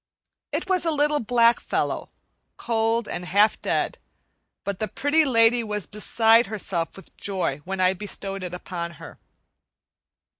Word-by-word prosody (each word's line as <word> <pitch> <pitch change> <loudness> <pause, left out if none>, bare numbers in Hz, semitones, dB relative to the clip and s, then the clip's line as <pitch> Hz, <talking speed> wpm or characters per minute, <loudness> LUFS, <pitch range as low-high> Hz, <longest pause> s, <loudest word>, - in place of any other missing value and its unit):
It - - -2
was 370 -2 +1
a 335 - +1
little 295 -1 +2
black 235 0 +3
fellow, - - -2 0.5
cold 225 0 0
and 175 - -5
half 205 +4 +3
dead; - - -1 0.6
but 200 -1 -4
the 215 - -1
Pretty 290 +10 +2
Lady 235 -2 +4
was 210 -3 -4
beside 225 +2 +3
herself 190 -5 -3
with 195 - -14
joy 185 -8 -1
when 190 +1 -4
I 185 0 +4
bestowed 195 0 -4
it 180 -1 -5
upon 170 -1 -5
her. 155 - -12
210 Hz, 145 wpm, -24 LUFS, 190-235 Hz, 0.6 s, Lady